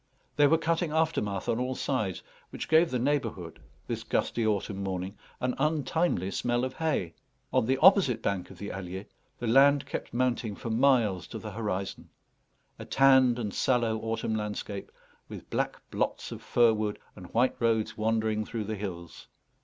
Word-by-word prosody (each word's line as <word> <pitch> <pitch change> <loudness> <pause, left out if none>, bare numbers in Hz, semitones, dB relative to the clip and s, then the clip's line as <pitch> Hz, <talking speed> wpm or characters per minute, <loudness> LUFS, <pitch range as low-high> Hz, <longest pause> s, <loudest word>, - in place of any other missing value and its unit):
They 145 -1 +5
were 165 - +4
cutting 165 0 0
aftermath 155 -12 0
on 115 - +1
all 130 +1 -1
sides, 110 -12 -2 0.3
which - - -6
gave 160 +2 +5
the 125 - -1
neighbourhood, 115 - -2 0.3
this - - -3
gusty 115 - -1
autumn 100 -1 -1
morning, 95 0 -3 0.2
an 125 0 0
untimely 150 - 0
smell 120 +4 0
of 130 - -5
hay. 150 - -1 0.4
On 110 - +2
the 130 +1 +2
opposite 170 - +5
bank 95 -3 -1
of - - -12
the 100 - -6
Allier 95 +1 -6 0.3
the 120 - -5
land 140 +4 +5
kept - - -5
mounting 120 -4 0
for 115 - -5
miles 115 - +3
to - - -7
the - - -7
horizon: 100 -3 -4 0.7
a - - -7
tanned 130 -3 +5
and 105 -5 -3
sallow 115 -3 +1
autumn 115 0 -2
landscape, 105 -2 -4 0.4
with - - -9
black - - -1
blots - - -2
of - - -7
fir 120 -2 +4
wood 105 -1 -2 0.2
and 90 -1 -11
white 125 +3 +3
roads 115 -2 +1
wandering 110 0 0
through 110 0 -4
the 110 +1 -3
hills. 85 -5 -7
115 Hz, 170 wpm, -29 LUFS, 100-130 Hz, 0.7 s, They